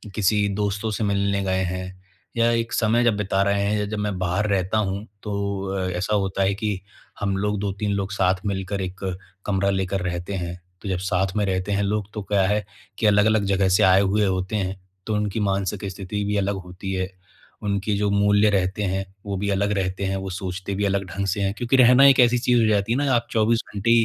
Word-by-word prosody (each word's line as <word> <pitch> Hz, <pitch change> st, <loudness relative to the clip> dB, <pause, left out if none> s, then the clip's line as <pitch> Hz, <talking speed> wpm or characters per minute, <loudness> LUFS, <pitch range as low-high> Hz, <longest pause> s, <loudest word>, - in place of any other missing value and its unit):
किसी 105 Hz, 0 st, +2 dB
दोस्तों 105 Hz, +1 st, -1 dB
से 110 Hz, -, -2 dB
मिलने 100 Hz, -1 st, +1 dB
गए 95 Hz, -1 st, 0 dB
हैं, 95 Hz, +1 st, -5 dB, 0.4 s
या 115 Hz, 0 st, +4 dB
एक 115 Hz, 0 st, -1 dB
समय 115 Hz, +1 st, +2 dB
जब 120 Hz, -3 st, +3 dB
बिता 100 Hz, -1 st, 0 dB
रहे 100 Hz, 0 st, +1 dB
हैं 105 Hz, +1 st, +1 dB
या 105 Hz, -, 0 dB
जब 105 Hz, +1 st, -4 dB
मैं 105 Hz, -2 st, -2 dB
बाहर 95 Hz, +3 st, 0 dB
रहता 95 Hz, +1 st, +1 dB
हूँ, 100 Hz, 0 st, -1 dB, 0.2 s
तो 100 Hz, -2 st, -2 dB
अ, 95 Hz, -1 st, -2 dB
ऐसा 100 Hz, +4 st, 0 dB
होता 95 Hz, -1 st, 0 dB
है 95 Hz, -, +2 dB
कि 105 Hz, -2 st, -2 dB, 0.4 s
हम 100 Hz, -1 st, -1 dB
लोग 105 Hz, +1 st, -1 dB
2-3 100 Hz, +1 st, -2 dB
लोग 100 Hz, 0 st, -2 dB
साथ 95 Hz, -2 st, +2 dB
मिलकर 100 Hz, 0 st, -2 dB
1 95 Hz, +1 st, -5 dB, 0.5 s
कमरा 100 Hz, -1 st, +1 dB
लेकर 95 Hz, 0 st, -1 dB
रहते 90 Hz, +2 st, -3 dB
हैं। 90 Hz, -1 st, -4 dB, 0.2 s
तो 100 Hz, -, -5 dB
जब 95 Hz, -, 0 dB
साथ 95 Hz, 0 st, -1 dB
में 105 Hz, -, +2 dB
रहते 95 Hz, +1 st, -1 dB
हैं 100 Hz, 0 st, +1 dB
लोग 105 Hz, 0 st, -2 dB
तो 105 Hz, -, -4 dB
क्या 100 Hz, 0 st, +1 dB
है 105 Hz, +1 st, 0 dB, 0.3 s
कि -, -, -1 dB
अलग-अलग 105 Hz, 0 st, +4 dB
जगह 95 Hz, -1 st, +2 dB
से 95 Hz, -, +4 dB
आए 95 Hz, +1 st, +6 dB
हुए 100 Hz, +2 st, +2 dB
होते 95 Hz, +1 st, -1 dB
हैं, 95 Hz, -2 st, -2 dB, 0.3 s
तो 110 Hz, -, -1 dB
उनकी 105 Hz, 0 st, -1 dB
मानसिक 100 Hz, 0 st, -1 dB
स्थिति 100 Hz, +2 st, -4 dB
भी 105 Hz, +1 st, -1 dB
अलग 100 Hz, 0 st, 0 dB
होती 90 Hz, +2 st, -6 dB
है, 95 Hz, 0 st, -1 dB, 0.6 s
उनके 100 Hz, 0 st, -1 dB
जो 105 Hz, 0 st, +1 dB
मूल्य 100 Hz, +1 st, +4 dB
रहते 95 Hz, +1 st, 0 dB
हैं, 95 Hz, 0 st, -1 dB, 0.2 s
वो 100 Hz, -1 st, -3 dB
भी 100 Hz, +1 st, -2 dB
अलग 100 Hz, +1 st, +1 dB
रहते 95 Hz, 0 st, -2 dB
हैं, 95 Hz, 0 st, -1 dB
वो 95 Hz, 0 st, -4 dB
सोचते 95 Hz, +1 st, -4 dB
भी 100 Hz, +1 st, 0 dB
अलग 100 Hz, 0 st, +1 dB
ढंग 100 Hz, 0 st, -2 dB
से 100 Hz, +2 st, -1 dB
हैं 100 Hz, 0 st, 0 dB
क्योंकि 125 Hz, +2 st, +1 dB
रहना 125 Hz, +2 st, +7 dB
एक 135 Hz, -1 st, +6 dB
ऐसी 125 Hz, 0 st, +5 dB
चीज़ 120 Hz, 0 st, +3 dB
हो 110 Hz, -, +3 dB
जाती 105 Hz, 0 st, +1 dB
है -, -, +1 dB
ना, 140 Hz, -1 st, +1 dB
आप 120 Hz, 0 st, 0 dB
24 115 Hz, +1 st, +2 dB
घंटे 105 Hz, +3 st, +1 dB
100 Hz, 225 wpm, -23 LUFS, 95-105 Hz, 0.6 s, रहना